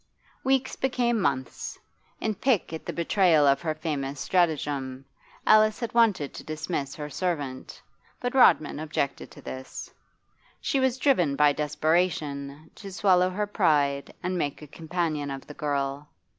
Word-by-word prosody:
Weeks 265 0 +1
became 240 -4 0
months. 130 -5 -2 0.4
In 220 - -1
pique 225 -7 0
at 160 - -7
the - - -1
betrayal 170 -3 +3
of 140 -1 +4
her 155 -2 -2
famous 145 -3 -3
stratagem, 145 -7 0 0.4
Alice 215 +1 +5
had 235 -2 -4
wanted 215 -11 +3
to - - -8
dismiss 155 -2 -4
her 150 -1 -5
servant, 145 -4 -3 0.4
but 245 0 -2
Rodman 155 - +4
objected 150 -3 -3
to - - -14
this. 130 0 -7 0.7
She 275 - 0
was 260 -1 +1
driven 180 - +2
by 145 0 +4
desperation 150 -1 -1
to 200 -2 -10
swallow 185 -1 +3
her 205 +3 -1
pride 145 -8 +1
and 180 0 -1
make 145 0 -3
a - - -10
companion 160 -2 -2
of 135 -1 -6
the 150 - -10
girl. 140 0 -2
155 Hz, 145 wpm, -27 LUFS, 140-195 Hz, 0.7 s, Alice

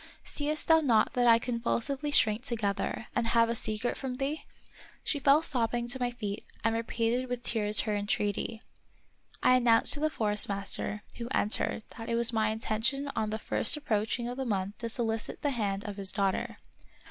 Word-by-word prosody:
^^ - - -18 0.2
Seest 300 +1 -2
thou 320 -1 +6
not 235 -7 +3
that 245 -1 +2
I 230 -1 +7
convulsively 250 +4 -2
shrink 220 -6 +3
together, 220 -4 -2
and 230 - +1
have 230 0 +3
a - - +1
secret 220 +1 -2
from 255 -2 -5
thee? 280 +4 -3 0.3
" - - -23
She 290 - -1
fell 280 +3 +4
sobbing 240 -4 0
to. 260 +2 -1
my 245 -1 0
feet 210 -4 -5 0.2
and 225 0 +2
repeated 230 +2 -1
with 245 -1 -4
tears 215 -3 +1
her 210 -2 -2
entreaty. 205 +2 -2 0.8
I 255 - +6
announced 235 -2 +6
to 285 - +1
the 310 +1 +1
Forest 210 -8 0
master, 200 +1 -2
who 235 - -5
entered, 220 -2 +1 0.2
that 225 +1 -6
it 230 - 0
was 235 0 +3
my 220 -1 +2
intention 230 +6 -1
on 215 - -1
the 215 - -2
first 225 +4 0
approaching 235 -3 -1
of 245 +1 -5
the 265 - -2
month 200 -3 -2
to 230 - -3
solicit 225 -2 -1
the 290 - +1
hand 205 -5 -2
of 205 -2 -6
his 195 -1 -1
daughter. 195 -2 -1
230 Hz, 195 wpm, -29 LUFS, 215-255 Hz, 0.8 s, I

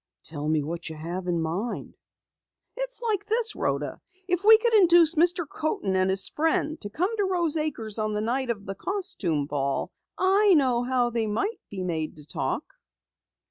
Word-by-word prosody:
"Tell 150 -1 -4
me 155 -2 +1
what 165 +3 -5
you 160 - -7
have 175 +4 -5
in 175 -1 0
mind." 185 +9 -4 0.8
"It's - - -5
like 420 -4 0
this, 445 +1 +1
Rhoda! - - -2 0.3
If 360 0 0
we 440 +1 +9
could 465 +1 0
induce 345 -5 +6
Mr. 345 +1 +2
Coaten 275 -12 -2
and 185 0 +2
his 190 0 +3
friend 310 0 0
to 205 - -5
come 365 - -1
to 410 - +2
Rose 345 -5 +1
Acres 235 -9 -2
on 215 0 -1
the 210 - -1
night 250 +3 -1
of 205 -4 -3
the 195 - -4
costume 205 - -2
ball, 140 -1 -2 0.3
I 390 +1 +4
know 255 -5 +3
how 245 -1 +1
they 225 -1 -1
might 315 - -2
be 190 -2 -5
made 160 -3 -3
to 150 - -13
talk!" - - -2
245 Hz, 180 wpm, -26 LUFS, -, 0.8 s, we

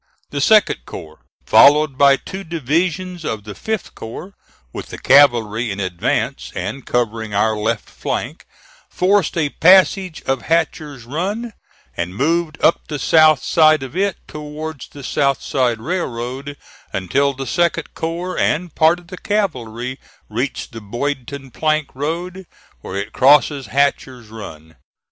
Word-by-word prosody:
The 145 - -3
2d 215 +9 +4
corps, 80 -3 -10 0.3
followed 150 0 +6
by 140 0 +6
two 190 +7 -8
divisions 170 +3 -2
of 110 -8 -3
the 105 0 -8
5th 220 - -4
corps, 155 - -9 0.4
with - - -6
the - - -8
cavalry 120 -5 +4
in 100 0 -4
advance 90 -3 -2
and 105 +9 -5
covering 110 -3 -1
our 110 +2 +2
left 105 +1 -2
flank, - - -5 0.4
forced 190 -2 +1
a 150 -3 +1
passage 185 +1 +4
of 135 -2 -1
Hatcher's 155 -5 -1
Run, 200 - -3 0.4
and 85 +2 -4
moved 160 +5 0
up 165 - +3
the 150 - -4
south 155 0 +4
side 155 -3 +4
of 135 +4 -8
it 195 0 0
towards 150 -1 -7
the 140 - -12
South 140 +1 +1
Side 125 -4 0
Railroad, 135 -2 -4 0.3
until 140 +9 0
the 135 +1 -5
2d 170 +7 0
corps 170 +3 -4
and 165 0 0
part 160 +2 +4
of 175 -1 -17
the 185 - -8
cavalry 130 - -2 0.3
reached 125 +7 -3
the 115 -1 -8
Boydton 135 +4 -4
Plank 155 +2 0
Road 170 +6 -4 0.3
where 95 - -8
it 100 +2 -4
crosses 140 0 +4
Hatcher's 130 -4 -1
Run. 80 -8 -11
140 Hz, 140 wpm, -19 LUFS, 120-165 Hz, 0.4 s, followed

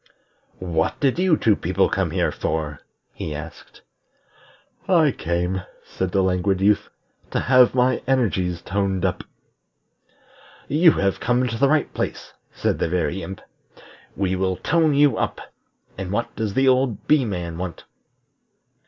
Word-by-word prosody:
"What 85 -3 -1
did 140 +3 +1
you 180 -4 +3
two 110 -2 +3
people - - +1
come - - -1
here - - 0
for?" 75 -2 -3 0.3
he 75 - -5
asked. 75 +2 -10 1.0
"I 165 -6 +4
came," 90 0 -2 0.2
said 95 -1 -3
the 95 0 +2
Languid 95 +1 +1
Youth, 100 +2 +2 0.4
"to - - -1
have 130 -1 +4
my 125 0 +2
energies 95 -10 0
toned 95 -1 -1
up." 90 - -1 1.4
"You 160 +2 +5
have 100 -1 0
come 125 +1 +1
to 115 - -3
the 135 +4 +3
right 155 0 +1
place," - - -4 0.2
said - - -1
the - - 0
Very 85 +1 -1
Imp. 95 +3 -7 0.8
"We 95 -1 0
will 95 0 0
tone 160 -2 +2
you 145 -1 +4
up. - - -2 0.6
And 95 -2 -4
what 115 +3 -2
does 110 -3 -3
that 135 - +3
old 130 -3 +2
Bee 150 -3 +4
man 90 -6 -4
want?" 90 -2 -6
100 Hz, 145 wpm, -22 LUFS, 90-130 Hz, 1.4 s, You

